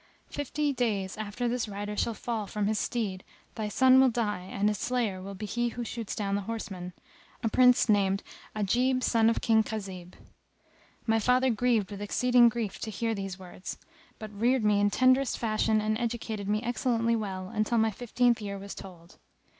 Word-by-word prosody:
Fifty 290 0 -1
days 210 -7 -1
after 215 +3 -3
this 240 -1 -1
rider 205 0 -5
shall 230 +1 -1
fall 220 -2 -3
from 210 0 -2
his 215 +1 0
steed 200 -6 -2 0.3
thy 215 -1 -3
son 260 +4 +5
will 265 - +5
die 220 -5 -1
and 200 +1 +1
his 210 -1 0
slayer 225 -7 -1
will 195 +1 -7
be 210 - -6
he 240 +4 -1
who 240 +1 -5
shoots 230 -2 -5
down 200 -2 -2
the 200 - 0
horseman, 190 -5 -5 0.5
a 225 - +2
Prince 250 +2 +5
named 200 -2 +2 0.3
Ajib 250 +5 +1
son 225 -1 +4
of 230 - 0
King 220 -1 +4
Khazib." 190 -5 -6 0.9
My 225 -1 +2
father 250 +3 +3
grieved 225 -3 +1
with 200 0 -7
exceeding 245 +3 +4
grief 225 -4 -4
to 220 - -4
hear 225 +2 -1
these 195 -2 -5
words; 185 0 -8 0.4
but 215 -1 -8
reared 235 +4 +2
me 210 -1 +3
in 205 0 +3
tenderest 255 +4 +3
fashion 220 -1 +1
and 215 0 0
educated 225 -4 -3
me 210 +2 0
excellently 235 -1 +1
well 190 -4 -4
until 215 +3 0
my 220 0 +3
fifteenth 240 +2 +1
year 200 -1 -4
was 200 0 -7
told. 175 -3 -12
220 Hz, 185 wpm, -29 LUFS, 200-240 Hz, 0.9 s, son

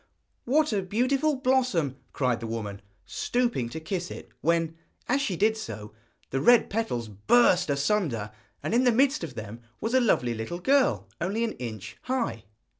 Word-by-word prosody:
'What 295 +1 +2
a 200 - +1
beautiful 255 +10 +1
blossom,' 255 - +1 0.2
cried 125 -4 0
the 115 - -5
woman, 105 -3 -5 0.2
stooping 240 - -1
to 160 - -6
kiss 175 +2 -3
it, - - -9
when, 165 0 +1 0.3
as 275 +3 +2
she 200 -9 -1
did 215 +5 +3
so, 105 - -7 0.4
the 135 - 0
red 240 - +5
petals 195 - -1
burst 180 - +3
asunder, 140 - 0 0.3
and - - -2
in 245 +2 +4
the 250 - +5
midst 270 - +3
of 145 -7 -6
them 110 +1 -7 0.2
was 225 +2 -2
a 260 - +5
lovely 125 - +2
little 110 +9 -4
girl 180 - +2
only 200 +7 0
an 230 - 0
inch 110 - -7
high. 235 - -2
180 Hz, 170 wpm, -27 LUFS, -, 0.4 s, red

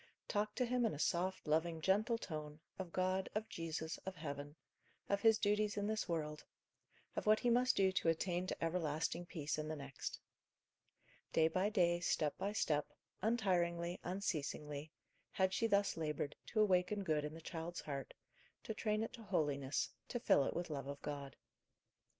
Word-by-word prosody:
Talk 210 0 0
to 250 - +2
him 250 0 +1
in 220 -8 +1
a - - -6
soft, 180 +5 0
loving, 160 +2 +2
gentle 210 +7 +3
tone, 155 -7 -5 0.2
of 185 -3 -4
God, 185 +1 +1
of 215 +1 -1
Jesus, 160 -1 -3
of 190 0 -6
heaven; 145 -3 -5 0.5
of 200 0 +1
his 225 0 +6
duties 210 0 +2
in 205 - 0
this 215 -2 -1
world; 150 -2 -2 0.7
of - - -2
what 215 0 +7
he 240 - +2
must 250 +2 +4
do 190 -1 +4
to 185 -3 +2
attain 175 +2 0
to - - -3
everlasting 165 0 0
peace 155 -3 -2
in 155 - -2
the 155 - -2
next. 140 -2 -5 1.1
Day 160 -1 +5
by 185 +5 +1
day, 175 -5 +3
step 155 -4 +1
by 200 - 0
step, 150 -8 +1 0.3
untiringly, 180 -5 +1
unceasingly, 150 -5 -2 0.4
had 190 0 +2
she 230 - +2
thus 200 -2 +3
laboured, 150 -3 -2
to 215 - +2
awaken 195 0 +3
good 155 -4 +1
in 150 +1 -4
the - - -7
child's 165 +1 -5
heart, 140 -2 -5 0.5
to 220 - -3
train 215 0 0
it 225 - -4
to 235 - -9
holiness, 145 -9 0 0.2
to 240 - -2
fill 145 - +5
it - - -2
with 175 -1 -2
love 140 -2 -3
of 140 0 -5
God. 140 -2 -4
175 Hz, 175 wpm, -38 LUFS, 155-205 Hz, 1.1 s, what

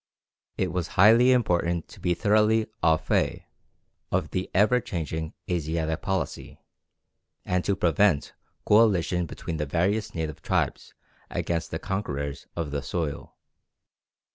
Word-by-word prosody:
It 95 -2 0
was 90 -1 -2
highly 115 +6 +7
important 85 -8 +1
to - - -14
be 90 -1 0
thoroughly 110 +2 +3 0.2
au 80 -1 +4
fait - - -1 0.7
of - - -1
the 95 - -2
ever 110 +6 +4
changing 80 -7 -4
Asiatic 80 -2 -1
policy, 95 -1 -3 0.9
and 90 -1 0
to 100 - +1
prevent 90 -3 +2 0.3
coalition 95 -5 +3
between 80 +1 -5
the 75 -1 -2
various 95 +8 0
native 80 -2 -4
tribes - - -1 0.3
against 85 -1 -2
the 80 - -3
conquerors 75 -8 -4
of 80 -4 -3
the 70 -1 -2
soil. 80 -2 -4
90 Hz, 125 wpm, -26 LUFS, 80-105 Hz, 0.9 s, highly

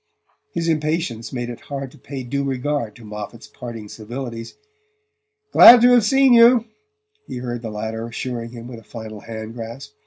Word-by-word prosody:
His 170 -1 -1
impatience 155 -7 -1
made 120 -1 -4
it 120 - -9
hard 135 -2 -6
to - - -17
pay 135 -2 -7
due 140 +3 -2
regard 135 -4 -2
to 115 - -14
Moffatt's 105 +2 -8
parting 115 -4 -8
civilities. 115 +2 -7 1.0
"Glad 240 -1 +10
to 245 +1 +6
have 245 -2 +6
seen 270 +2 +5
you," 235 0 +7 0.6
he - - -6
heard 120 -1 -4
the 115 - -5
latter 110 +2 -4
assuring 115 0 -5
him 120 0 -10
with 120 -2 -9
a - - -18
final 110 -1 -9
hand 110 0 -8
grasp. 120 +5 -8
120 Hz, 175 wpm, -21 LUFS, 115-145 Hz, 1.0 s, Glad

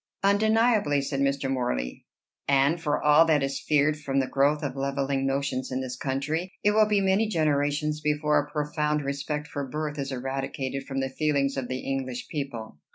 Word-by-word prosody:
"Undeniably," 215 -5 +3
said 135 0 -2
Mr. 140 0 +1
Morley. 120 - -2 0.4
"And 140 +4 +3
for 150 -3 0
all 150 +2 +7
that 155 -3 +3
is 135 0 -2
feared 150 0 +2
from 135 -2 -1
the 135 - +2
growth 145 +3 +1
of 140 -2 -3
levelling 135 0 -1
notions 135 -1 -1
in 130 - -1
this 130 -1 -4
country, 145 +8 -2
it 205 - +4
will 215 0 +4
be 210 -1 +2
many 195 +3 +2
generations 150 -3 0
before 150 0 +2
a 145 0 -4
profound 150 -1 -1
respect 140 +2 -3
for 145 - -4
birth 150 0 -3
is 140 0 -3
eradicated 135 +1 -4
from 135 -1 -2
the 135 - -2
feelings 140 0 0
of 135 -2 -3
the 130 +1 -3
English 130 -2 -4
people." 120 - -5
140 Hz, 180 wpm, -27 LUFS, 135-150 Hz, 0.4 s, all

